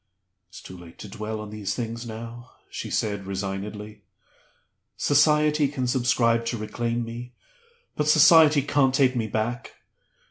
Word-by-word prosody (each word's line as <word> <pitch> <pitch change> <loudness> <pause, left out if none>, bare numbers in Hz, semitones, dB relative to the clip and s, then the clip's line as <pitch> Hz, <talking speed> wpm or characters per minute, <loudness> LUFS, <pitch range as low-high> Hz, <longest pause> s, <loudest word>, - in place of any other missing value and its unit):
"It's 95 - -13
too 95 - -10
late 85 -2 -14
to 105 - -9
dwell 110 +1 -6
on 105 -1 -8
these 100 -2 -4
things 115 0 -5
now," 115 +2 -9 0.2
she - - -6
said, 100 -3 -2
resignedly. 105 +2 -5 1.0
"Society 150 0 +3
can 135 -2 -3
subscribe 120 -2 +1
to 120 - -2
reclaim 115 +2 -3
me; 120 +2 -8 0.6
but 150 - -1
Society 155 -1 +6
can't 135 -2 +2
take 130 -2 +3
me 115 -2 -1
back. 110 +3 -3
115 Hz, 140 wpm, -25 LUFS, 105-130 Hz, 1.0 s, Society